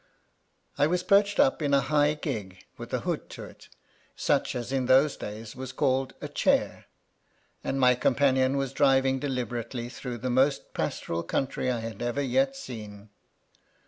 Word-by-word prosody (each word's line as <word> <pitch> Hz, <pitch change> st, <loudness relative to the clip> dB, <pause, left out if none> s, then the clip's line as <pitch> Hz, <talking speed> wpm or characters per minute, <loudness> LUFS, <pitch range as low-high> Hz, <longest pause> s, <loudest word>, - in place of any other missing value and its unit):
I 145 Hz, -, +5 dB
was 180 Hz, +2 st, 0 dB
perched 200 Hz, +1 st, +3 dB
up 275 Hz, -, +3 dB
in 140 Hz, -2 st, +2 dB
a -, -, +5 dB
high 145 Hz, +2 st, +2 dB
gig 105 Hz, -, -5 dB
with -, -, -9 dB
a -, -, -1 dB
hood -, -, -3 dB
to -, -, -7 dB
it, -, -, -13 dB, 0.5 s
such -, -, 0 dB
as 120 Hz, +1 st, -4 dB
in 130 Hz, -2 st, 0 dB
those 135 Hz, +3 st, +5 dB
days 105 Hz, +1 st, -8 dB
was 130 Hz, 0 st, -6 dB
called 130 Hz, 0 st, 0 dB
a -, -, -4 dB
chair, -, -, 0 dB, 0.8 s
and 135 Hz, -, -2 dB
my 125 Hz, -1 st, +6 dB
companion 130 Hz, +1 st, +2 dB
was 135 Hz, -1 st, -2 dB
driving 135 Hz, -2 st, +3 dB
deliberately 120 Hz, -3 st, -3 dB
through 125 Hz, -1 st, -6 dB
the 125 Hz, +2 st, -3 dB
most 135 Hz, +3 st, +1 dB
pastoral 85 Hz, 0 st, -2 dB
country 130 Hz, +8 st, -2 dB
I 120 Hz, -2 st, -1 dB
had 115 Hz, -1 st, -7 dB
ever 120 Hz, +4 st, -1 dB
yet 270 Hz, -, +1 dB
seen. 105 Hz, -, -9 dB
130 Hz, 165 wpm, -27 LUFS, 120-140 Hz, 0.8 s, my